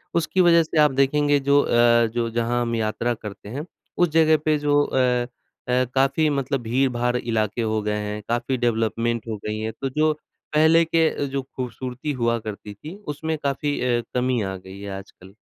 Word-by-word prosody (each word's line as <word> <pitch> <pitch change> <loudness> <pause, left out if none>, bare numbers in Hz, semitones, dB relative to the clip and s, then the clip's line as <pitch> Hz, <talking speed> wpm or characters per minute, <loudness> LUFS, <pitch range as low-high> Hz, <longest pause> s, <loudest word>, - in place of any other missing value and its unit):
उसकी 170 +3 +2
वजह 170 -1 +6
से 160 0 -5
आप 150 -1 +5
देखेंगे 145 +2 +2
जो 140 +1 +3
अ, 120 0 +4
जो 120 -1 -1
जहाँ 120 +1 0
हम 115 -1 -1
यात्रा 115 +2 -1
करते 105 -2 -9
हैं, 145 +7 -5 0.3
उस 175 -2 +3
जगह 160 0 +4
पे 155 -1 +3
जो 145 0 +3
अ - - -3 0.7
अ, 125 +1 +2
काफ़ी 140 +4 +3
मतलब 140 -2 -1
भीड़-भाड़ 125 0 0
इलाके 115 -1 -1
हो 110 -1 0
गए 105 0 -1
हैं। 105 0 -4
काफ़ी 120 +2 0
डेवलपमेंट 115 -1 0
हो 110 -2 -3
गई 105 0 -3
हैं 110 +1 -3
तो 135 - -1
जो 155 +3 +2 0.4
पहले 160 +2 +5
के 165 0 +3
अ, - - -4
जो 135 0 -2
खूबसूरती 130 +2 -5
हुआ 115 0 +2
करती 105 -1 -7
थी 155 - -10 0.2
उसमें 160 +2 -3
काफ़ी 145 +1 -1
अ, 120 -1 +1
कमी 125 -1 +1
आ 95 -1 -3
गई 95 +1 -12
है 100 - -6
आजकल। 95 0 -14
125 Hz, 190 wpm, -23 LUFS, 115-145 Hz, 0.7 s, वजह